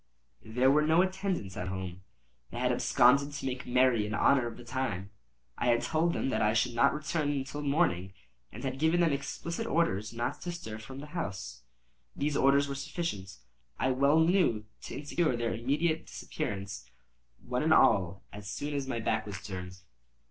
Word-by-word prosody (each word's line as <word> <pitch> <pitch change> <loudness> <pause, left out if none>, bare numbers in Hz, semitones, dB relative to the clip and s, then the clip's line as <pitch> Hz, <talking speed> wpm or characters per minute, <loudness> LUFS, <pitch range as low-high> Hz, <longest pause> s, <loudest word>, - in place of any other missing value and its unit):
There 125 +4 +3
were 150 +2 +4
no 160 +4 +4
attendants 185 - -2
at 90 - -4
home; 95 -1 -5 0.5
they - - -8
had 125 +1 +1
absconded 140 +3 +4
to 140 - -5
make 130 -1 -4
merry 125 -3 +3
in 105 - -2
honor 130 +2 +3
of 115 - -7
the 120 - -11
time. 115 -6 -3 0.5
I - - 0
had 120 -1 +3
told 165 +2 +1
them - - -1
that - - 0
I 105 +1 +2
should 120 +2 +2
not 140 +5 +3
return 155 0 -1
until 140 +1 -3
the 145 - -4
morning, 120 - +1 0.4
and - - -9
had 135 0 -3
given 160 +3 +3
them 165 -4 +3
explicit 170 +9 -4
orders 110 - +1
not 120 +1 -3
to 175 - -4
stir 110 -11 -7
from 130 +4 -9
the - - -7
house. 95 - -5 0.5
These 145 +1 -1
orders 140 +1 +4
were 140 - -3
sufficient, 135 - -4 0.4
I 130 - +1
well 140 +4 +4
knew, 160 - +3 0.2
to - - -6
insure 145 -1 0
their 115 -1 -1
immediate 150 +8 0
disappearance, 100 -8 -5 0.5
one 125 0 -3
and 160 +1 +2
all, 100 - +4
as 100 -1 -8
soon 145 +7 -4
as 140 -2 -2
my 120 -3 -2
back 110 - -1
was 100 -3 -7
turned. 95 -1 -7
130 Hz, 185 wpm, -30 LUFS, 110-150 Hz, 0.5 s, were